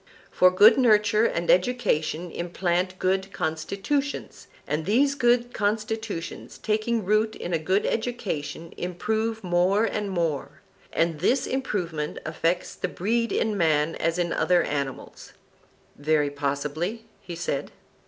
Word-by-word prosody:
For 185 - +5
good 205 +7 +6
nurture 215 -2 +4
and 170 0 +1
education 180 -6 +1
implant 180 +1 -1
good 190 +1 0
constitutions, 200 - -3 0.2
and 155 +2 -2
these 270 +7 +3
good 245 -2 +2
constitutions 215 -3 -3
taking 220 0 -1
root 215 +2 +2
in 175 - -5
a 165 - +2
good 185 +6 +1
education 200 -9 -3
improve 220 +5 -2
more 180 +4 +2
and 210 -2 -2
more, 165 -6 -2 0.3
and 165 -2 0
this 255 - +2
improvement 175 - -2
affects 165 +3 -1
the - - -3
breed 230 +6 -1
in 215 -1 0
man 160 -3 +2
as 165 +1 -1
in 175 -1 0
other 180 -1 +3
animals. 140 -3 -5 0.6
Very 145 0 +1
possibly, 150 +10 -3
he 175 -2 -8
said. 165 -5 -3
185 Hz, 125 wpm, -25 LUFS, 165-220 Hz, 0.6 s, good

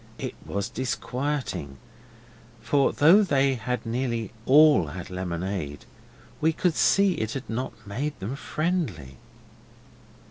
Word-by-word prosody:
It - - -4
was 100 0 -2
disquieting, 125 - -3 0.8
for 135 +5 +2
though 170 +8 +6
they 140 -8 +2
had 125 -1 -3
nearly 115 -2 -2 0.2
all 145 - +6
had 85 +4 -7
lemonade 90 -4 -4 0.6
we 160 +1 +3
could 175 +1 +1
see 195 +3 +4
it 110 -8 -3
had 135 -1 -5
not 115 -1 -5
made 135 +9 -4
them 105 +7 -4
friendly. 140 - -3
125 Hz, 115 wpm, -26 LUFS, 95-145 Hz, 0.8 s, though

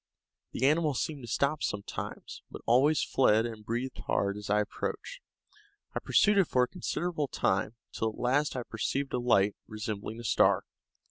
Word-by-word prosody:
The 130 - 0
animal 150 0 +3
seemed 145 +2 -2
to 120 - -9
stop 140 +2 +1
sometimes, 100 -1 -5
but - - -10
always 140 +6 +4
fled 110 -4 +3
and 110 -2 -6
breathed 120 +4 -3
hard 100 0 +1
as 105 -1 -7
I 105 +1 +3
approached. - - -5 0.7
I - - -1
pursued 205 -1 +4
it 185 - +4
for 125 - +3
a - - +1
considerable 170 -1 -2
time, 105 -1 0 0.2
till 110 - -1
at 110 - -10
last 140 +4 +1
I 125 - -2
perceived 135 +5 -2
a 125 - +1
light, 105 -5 +3
resembling 110 0 -5
a - - -7
star. - - +3
125 Hz, 175 wpm, -30 LUFS, 110-145 Hz, 0.7 s, always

